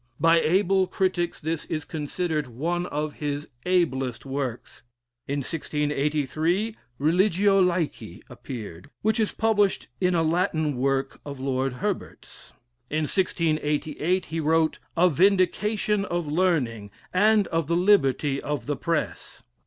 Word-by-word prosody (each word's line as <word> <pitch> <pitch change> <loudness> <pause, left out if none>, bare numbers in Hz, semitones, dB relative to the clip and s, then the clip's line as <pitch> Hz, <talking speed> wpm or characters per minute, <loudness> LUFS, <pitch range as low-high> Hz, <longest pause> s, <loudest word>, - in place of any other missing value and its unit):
By 165 0 +5
able 190 +3 +2
critics 180 -3 -1
this 160 +1 -3
is 155 -2 -3
considered 155 -1 -2
one 170 +9 -2
of 150 0 -3
his 145 0 -2 0.2
ablest 135 -10 0
works 135 -3 -4 0.5
in 140 +1 -1
1683, 150 - -1 0.2
"Religio 190 +5 +3
Laici" 175 -3 -1
appeared, 105 -9 -8
which 220 +2 +2
is 215 - +1
published 210 -3 +1
frum 180 -1 +2
a 165 - +3
Latin 160 -3 +1
work 135 +1 -1
of 140 -2 -7
Lord 130 0 -1
Herbert's. 200 +8 -5 0.4
In 155 +1 0
1688 155 0 0
he 165 +2 -4
wrote 160 +1 +2 0.2
"A 180 +2 +6
Vindication 200 +4 +2
of 175 -3 -2
Learning, 145 - 0 0.2
and 210 +2 +4
of 165 -2 -1
the 170 +1 +1
Liberty 145 -7 +3
of 145 -5 -3
the 145 - -1
Press." 165 +2 -3
160 Hz, 125 wpm, -25 LUFS, 145-185 Hz, 0.5 s, A